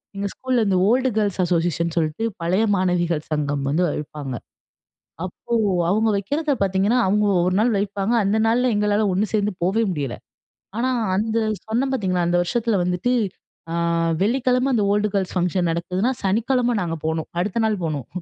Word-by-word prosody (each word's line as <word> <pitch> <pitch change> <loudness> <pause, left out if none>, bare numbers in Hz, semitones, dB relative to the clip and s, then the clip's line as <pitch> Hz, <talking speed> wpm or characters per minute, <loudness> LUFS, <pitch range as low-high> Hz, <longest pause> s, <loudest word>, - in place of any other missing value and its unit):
எங்க 200 0 -2
ஸ்கூல்ல 255 -3 0
இந்த 190 -2 +2
ஓல்டு 255 +3 +3
கேர்ள்ஸ் 205 -3 0
அசோசியேஷன் 170 -1 0
சொல்ட்டு 160 +4 -1 0.2
பழைய 180 +6 +1
மாணவிகள் 175 -4 0
சங்கம் 145 -2 -1
வந்து 160 +6 +1
வைப்பாங்க. 145 -3 -5 0.9
அப்போ 185 +5 -8 0.4
அவுங்க 215 +4 +2
வக்கிறத 290 +10 -1
பார்த்தீங்கன்னா, 195 +5 +2
அவங்க 210 +2 +2 0.2
ஒரு 185 - +1
நாள் 235 +2 +2
வைப்பாங்க. 200 +3 -1
அந்த 200 +3 +1
நாள்ல 245 +2 +2
எங்களால 210 0 +2
ஒன்னு 195 +4 +1
சேர்ந்து 210 -1 +1
போவே 205 +5 +2
முடியல. 140 -7 -3 0.6
ஆனா, 255 +2 +1 0.3
அந்த 220 +3 -1 0.3
சொன்னேன் 245 +5 0
பார்த்தீங்களா 185 -8 0
அந்த 175 0 +2
வருஷத்தில 230 +1 0
வந்துட்டு, 180 +7 0 0.6
ஆ - - -3 0.5
வெள்ளிக்கிழம 255 +4 +2
அந்த 215 -4 +2
ஓல்ட் 210 0 +1
கேர்ல்ஸ் 190 -1 -1
ஃபங்ஷன் 180 0 +1
நடக்குதுனா 180 +8 -1
சனிக்கிழமை 240 +5 +1
நாங்க 165 -1 -3
போனோம். 160 -1 -2
அடுத்த 210 +4 -1
நாள் 205 -5 -2
போனோம். 155 +3 -4
200 Hz, 155 wpm, -22 LUFS, 175-225 Hz, 0.9 s, ஓல்டு